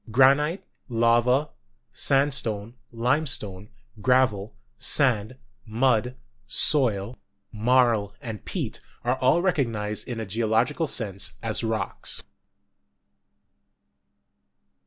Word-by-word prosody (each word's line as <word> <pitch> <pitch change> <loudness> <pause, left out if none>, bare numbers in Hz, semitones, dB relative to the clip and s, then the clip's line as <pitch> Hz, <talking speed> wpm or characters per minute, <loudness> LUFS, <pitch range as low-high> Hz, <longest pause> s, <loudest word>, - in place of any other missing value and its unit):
Granite, 140 - +4 0.3
lava, 120 +4 +2 0.4
sand 140 +1 +2
stone, 110 -3 -2 0.2
limestone, 115 -5 -1 0.3
gravel, 110 -4 +2 0.2
sand, 125 -4 +1 0.3
mud, 120 +2 +1 0.3
soil, 120 -6 +2 0.3
marl 115 -2 +2
and 115 -6 -7
peat, - - -4 0.2
are 125 +2 +1
all 135 +8 +3
recognised 115 - -1
in 120 -2 -4
a 110 - -3
geological 115 - 0
sense 95 - -2
as - - -2
rocks. 110 -4 -3
120 Hz, 85 wpm, -25 LUFS, 110-130 Hz, 0.4 s, Granite